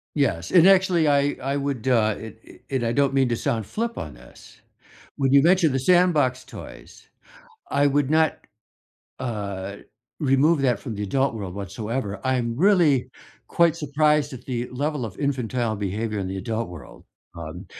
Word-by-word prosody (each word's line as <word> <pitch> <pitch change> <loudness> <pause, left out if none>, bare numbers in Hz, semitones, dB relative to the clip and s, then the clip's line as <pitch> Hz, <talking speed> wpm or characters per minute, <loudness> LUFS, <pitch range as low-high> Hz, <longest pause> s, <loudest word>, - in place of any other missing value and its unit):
Yes, 140 -2 0
and, 175 -2 +6
actually, 185 -5 +4
I 145 0 +2
I 135 +1 -1
would, 140 -3 -2
uh, 110 -4 +3
it 110 0 -10
it - - -16 0.2
and 120 - -2
I 115 - 0
don't 140 0 +2
mean 135 -1 +3
to 120 - +1
sound 115 -1 -2
flip 230 - -4
on 75 - -6
this. - - -17 0.6
When 135 -1 +1
you 140 - +7
mentioned 170 -2 +3
the 135 - +1
sandbox 150 -5 +3
toys, - - -12 0.6
I 140 0 +2
would 140 -1 +2
not, 160 0 +2 0.8
uh, 100 -5 -4 0.4
remove 145 +3 +3
that 125 -5 +1
from 110 +2 -6
the 105 - -5
adult 135 +6 0
world 100 -5 -6
whatsoever, 100 +2 -4
I'm 125 -3 0
really 155 - +3 0.4
quite 170 -1 +3
surprised 150 -1 +1
at 125 - -11
the 125 -2 -3
level 145 +1 -2
of 95 - -11
infantile 125 -5 -1
behavior 105 +2 -3
in 95 -2 -3
the 95 - -4
adult 115 +2 -3
world, 80 -8 -12 0.3
um, 85 +3 -8
130 Hz, 170 wpm, -24 LUFS, 110-145 Hz, 0.8 s, you